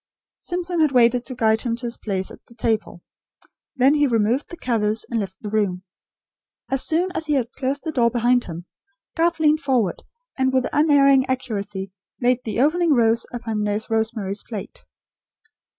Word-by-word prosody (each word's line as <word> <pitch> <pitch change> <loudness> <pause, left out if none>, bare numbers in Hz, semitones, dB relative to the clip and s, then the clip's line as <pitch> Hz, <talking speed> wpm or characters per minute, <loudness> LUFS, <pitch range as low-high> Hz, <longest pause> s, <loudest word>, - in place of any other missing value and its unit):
Simpson 350 -1 -3
had 310 -3 +4
waited 245 0 +4
to 255 - -6
guide 220 -2 +2
him 235 -2 -1
to 245 +1 -8
his 235 0 -2
place 190 -3 -2
at - - -14
the 235 - -18
table. 220 -6 -2 0.7
Then 265 +2 +4
he 295 -1 +3
removed 230 +3 +1
the 345 - -9
covers, 220 -4 -1
and 230 - 0
left 190 -2 -5
the 210 - -4
room. 195 -4 0 0.9
As 270 -1 +2
soon 350 +4 +1
as 320 -4 -4
he 300 - +1
had 250 -4 0
closed 270 +1 -3
the 320 - -3
door 240 -5 +3
behind 245 +1 +2
him, 170 0 -7 0.5
Garth 340 0 +1
leaned 305 0 +4
forward, 250 - 0 0.3
and 260 0 +1
with 260 -1 +1
unerring 275 -3 +4
accuracy 205 -7 -3 0.3
laid 250 0 +1
the 225 +2 -1
opening 325 +3 +3
rose 230 -1 +2
upon 225 -3 -3
Nurse 210 +2 -2
Rosemary's 220 -3 -1
plate. 215 -5 -8
240 Hz, 175 wpm, -22 LUFS, 220-275 Hz, 0.9 s, had